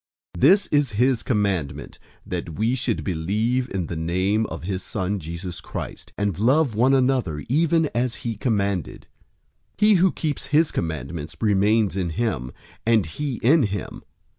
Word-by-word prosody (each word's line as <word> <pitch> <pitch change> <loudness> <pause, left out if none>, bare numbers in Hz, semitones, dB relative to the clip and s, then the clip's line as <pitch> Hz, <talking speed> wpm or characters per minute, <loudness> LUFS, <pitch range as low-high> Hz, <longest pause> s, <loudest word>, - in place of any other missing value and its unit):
003:023 85 - -7
This 195 +7 +5
is 145 -4 +2
his 125 +3 +2
commandment, 95 - -2 0.3
that 80 - -5
we 110 +3 +1
should 125 -3 -1
believe 110 +9 0
in 95 -3 -2
the 85 - -5
name 95 +7 0
of 80 - -7
his 95 +1 -3
Son, 100 -1 -3
Jesus 85 +2 -6
Christ, - - -7
and 100 -4 -1
love 130 +3 +3
one 125 +5 +4
another, 125 - +1
even 160 +4 +2
as 120 0 0
he 115 -1 -1
commanded. 100 - -1 0.7
003:024 - - -28
He 210 0 +6
who 185 -1 +4
keeps 150 -4 -3
his 150 +2 +3
commandments 80 -1 -4
remains 105 -1 +2
in 90 -3 -1
him, 80 - -2 0.3
and 115 -3 +3
he 135 - -4
in 150 +7 +5
him. 100 -4 -3
105 Hz, 160 wpm, -23 LUFS, 90-130 Hz, 0.7 s, He